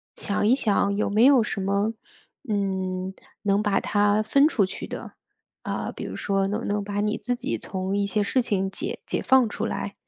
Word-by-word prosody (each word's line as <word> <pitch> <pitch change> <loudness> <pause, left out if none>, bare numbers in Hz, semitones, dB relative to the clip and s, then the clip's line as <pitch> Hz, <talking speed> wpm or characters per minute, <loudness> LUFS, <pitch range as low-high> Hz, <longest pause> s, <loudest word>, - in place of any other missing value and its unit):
想 205 0 -1
一 245 - +5
想 200 -5 +1
有 210 - +1
没 215 +3 +3
有 265 -4 +6
什 210 - -3
么， 200 +3 0 0.6
嗯， 190 -2 -1 0.3
能 200 0 +2
把 205 -2 +2
它 205 +1 +2
分 275 +7 +4
出 210 -11 +2
去 - - -7
的， - - -7 0.5
呃， - - -3
比 - - -8
如 - - -5
说 195 -1 0
能 210 +3 -1
不 - - -6
能 205 0 -1
把 205 0 -3
你 210 +1 0
自 245 +3 -1
己 255 +3 -3
从 190 +1 -3
一 200 0 +1
些 205 +1 0
事 255 +5 +1
情 195 -5 -1
解 355 - -4
解 - - -2
放 260 -3 +4
出 220 +1 -3
来。 200 - -4
205 Hz, 220 characters per minute, -25 LUFS, 195-225 Hz, 0.6 s, 有